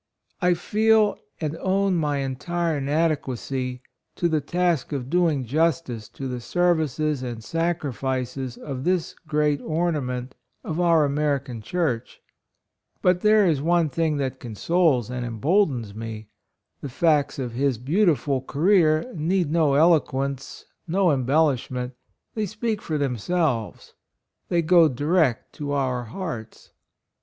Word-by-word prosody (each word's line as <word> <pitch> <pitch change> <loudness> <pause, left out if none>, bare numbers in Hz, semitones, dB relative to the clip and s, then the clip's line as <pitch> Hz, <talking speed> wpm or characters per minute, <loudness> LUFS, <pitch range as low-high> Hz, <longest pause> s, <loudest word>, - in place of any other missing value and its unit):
I 180 -1 +3
feel 215 +3 +3 0.2
and 155 -1 -2
own 195 +1 +1
my 150 -4 0
entire 160 +4 -2
inadequacy 135 -4 -1 0.3
to 175 - +1
the 160 -2 +1
task 170 -1 0
of 135 -2 -4
doing 165 -7 +2
jus 160 +6 +2
tice 120 -9 -8
to 135 - -6
the 125 -1 -4
services 155 -3 0
and 120 -3 -5
sacrifices 135 -6 -2
of 135 -3 -6
this 180 -1 0
great 150 -1 +1
ornament 145 -7 -2 0.3
of 160 +1 -3
our 165 -4 +4
Ameri 140 -1 0
can 120 -4 -7
Church; 140 -3 -2 0.8
but 180 -1 +3
there 215 -1 +5
is 155 -6 +2
one 170 0 +2
thing 155 +1 0
that 135 -2 -3
consoles 125 - +1
and 125 -1 -3
emboldens 120 - 0
me; 110 -1 -7 0.5
the 140 - -5
facts 150 +2 +2
of 125 -3 -3
his 130 +1 0
beautiful 145 - +1
career 155 +2 +3
need 170 0 0
no 155 -4 +3
eloquence 140 -4 +1
— - - -56
no 180 +1 +2
embellishment 130 -2 +1 0.2
— - - -54
they 215 -2 -2
speak 215 +1 -3
for 155 - -2
themselves 135 - -1 0.3
— - - -53
they 170 -1 +2
go 170 0 +6
direct 145 -1 +1
to 145 -1 -4
our 130 -3 -1
hearts. 120 - -7
150 Hz, 135 wpm, -24 LUFS, 130-170 Hz, 0.8 s, go